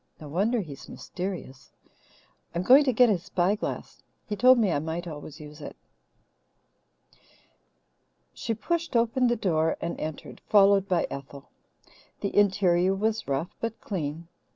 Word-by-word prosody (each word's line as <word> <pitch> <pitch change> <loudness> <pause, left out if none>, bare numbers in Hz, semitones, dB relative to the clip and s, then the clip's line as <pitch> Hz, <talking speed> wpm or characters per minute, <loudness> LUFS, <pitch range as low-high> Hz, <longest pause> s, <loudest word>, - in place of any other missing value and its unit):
No 150 - -9
wonder 210 +9 +1
he's 145 -7 -10
mysterious. 175 -8 -7 0.8
I'm 175 - 0
going 265 +8 +7
to 260 - +3
get 245 +1 +5
his 200 -6 +1
spyglass. 190 +4 -2 0.2
He 210 - -3
told 255 +4 +6
me 215 -6 +2
I 145 - +1
might 160 +3 -4
always 150 -3 -8
use 150 0 -11
it." - - -8 2.6
She 225 - -3
pushed 335 +5 -2
open 235 +2 +2
the 240 - +2
door 165 -7 0
and 170 - -4
entered, 155 -1 -7
followed 200 -1 +5
by 180 -3 +1
Ethel. 140 0 -9 0.7
The 200 - -3
interior 190 -2 +3
was 220 +2 -1
rough 140 +5 -2
but 230 -1 -4
clean. 165 -3 -4
190 Hz, 140 wpm, -27 LUFS, 160-220 Hz, 2.6 s, going